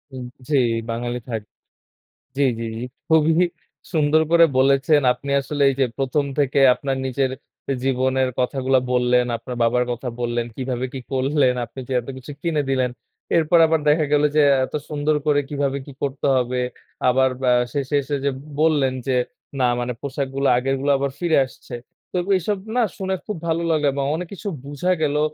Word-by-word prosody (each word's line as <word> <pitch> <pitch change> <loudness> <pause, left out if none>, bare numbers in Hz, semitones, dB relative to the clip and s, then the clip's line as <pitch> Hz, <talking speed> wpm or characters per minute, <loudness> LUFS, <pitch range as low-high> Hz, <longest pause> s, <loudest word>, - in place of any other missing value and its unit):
উ - - -7 0.3
জি, 145 - +2 0.3
বাঙালি 120 +1 -2
থাক 110 -2 -2 1.0
জি, 140 - +1 0.2
জি, 115 - -4
জি, 120 - -4 0.2
খুবই 160 0 +4 0.6
সুন্দর 155 0 +3
করে 170 0 +7
বলেছেন, 135 +3 +4
আপনি 140 +3 -8
আসলে 145 +1 -3
এই - - -2
যে, 135 - +4
১ম 135 +2 0
থেকে 140 0 +2
আপনার 135 0 -3
নিজের 130 0 0 0.5
জীবনের 130 0 +1
কথাগুলা 130 0 +1
বললেন, 125 0 +3
আপনার 120 +2 -7
বাবার 125 +1 +2
কথা 125 +2 -5
বললেন, 120 0 -1
কিভাবে 130 -1 -2
কি 130 - -4
করলেন, 135 -1 +2
আপনি 120 +3 -10
যে, - - -4
এত 120 - -16
কিছু 130 +3 -9
কিনে 160 -4 0
দিলেন। 130 -2 +1 0.5
এরপর 165 +1 +4
আবার 160 0 +1
দেখা 155 +1 +4
গেল 145 0 +4
যে, 150 - +6 0.2
এত - - -9
সুন্দর 150 0 0
করে 145 -1 +3
কিভাবে 140 -1 -1
কি 140 - -10
করতে 140 0 -2
হবে। 125 0 0 0.5
আবার 130 +1 +3
বা 125 - +3 0.2
শেষে 140 0 -1
এসে 145 +1 -2
যে, 140 - +2 0.3
বললেন, 150 -5 +3
যে, 130 - +1 0.5
না - - +3 0.2
মানে 120 0 -2
পোশাকগুলা 140 0 -2
আগেরগুলা 135 +2 0
আবার 140 0 -1
ফিরে 170 -4 +2
আসছে। 130 - -12 0.4
তো - - -3 0.2
এসব 200 +3 -2 0.2
না 245 - +4 0.2
শুনে 190 0 -1
খুব 210 - -3
ভালো 165 +1 0
লাগলো 155 -2 +2
এবং 140 -1 -1
অনেক 175 0 -5
কিছু 205 +2 -6 0.2
বুঝা 145 +6 -1
গেলো 150 0 +1
135 Hz, 175 wpm, -22 LUFS, 130-150 Hz, 1.0 s, করে